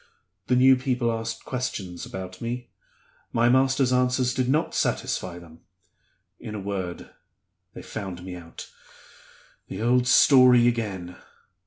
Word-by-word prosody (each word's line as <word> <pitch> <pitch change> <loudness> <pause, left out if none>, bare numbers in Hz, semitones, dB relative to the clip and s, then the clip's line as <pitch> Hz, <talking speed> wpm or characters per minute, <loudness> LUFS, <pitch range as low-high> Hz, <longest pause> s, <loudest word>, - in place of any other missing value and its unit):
The 125 - +2
new 130 +1 +6
people 125 -2 -1
asked 115 0 -5
questions 100 -9 -5
about 95 -1 -8
me; 120 +1 -5 0.6
my 120 +1 +2
master's 130 0 +3
answers 125 0 +1
did 130 -1 -1
not 155 +5 +1
satisfy 90 -2 -2
them. 85 -2 -14 0.8
In 110 -3 -7
a - - -4
word, 95 -3 -5 0.6
they - - -9
found 90 -2 -7
me 90 -1 -7
out. 85 -1 -10 1.0
The 100 +4 -5
old 125 +1 +2
story 125 -2 +6
again! 100 -7 -3
120 Hz, 130 wpm, -25 LUFS, 95-125 Hz, 1.0 s, new